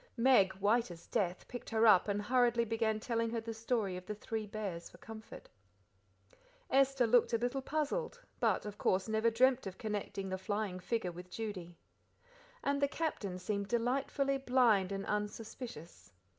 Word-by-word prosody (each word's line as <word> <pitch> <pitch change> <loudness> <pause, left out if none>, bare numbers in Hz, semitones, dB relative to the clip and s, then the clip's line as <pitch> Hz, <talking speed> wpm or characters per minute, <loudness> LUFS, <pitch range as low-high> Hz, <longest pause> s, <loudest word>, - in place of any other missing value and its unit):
Meg, 230 -6 +5
white 210 +4 +2
as 170 -1 -10
death, 180 -2 -1
picked 245 - -7
her 225 0 +3
up 210 -4 +6
and 205 0 -1
hurriedly 240 0 +3
began 220 -1 0
telling 230 0 -1
her 230 0 -2
the 225 0 -5
story 220 -4 -1
of 180 0 -8
the 210 - -3
three 215 +1 -4
bears 195 -5 -5
for - - -16
comfort. 220 +4 -10 1.2
Esther 270 -1 +4
looked 240 +1 +4
a - - +4
little 245 +4 -1
puzzled, 310 - -2 0.2
but, - - +1
of 210 -1 -7
course, 190 +2 +1
never 220 +1 +2
dreamt 255 +1 +3
of 190 - -7
connecting 205 -2 -4
the 190 0 -3
flying 205 -1 -2
figure 185 -1 -2
with 180 +1 -10
Judy. 180 -5 -6 0.9
And 280 0 0
the 280 - +4
Captain 275 - -3
seemed 200 +2 -2
delightfully 270 +4 0
blind 240 -8 +3
and 195 0 -3
unsuspicious. 210 - -5
220 Hz, 165 wpm, -34 LUFS, 195-245 Hz, 1.2 s, up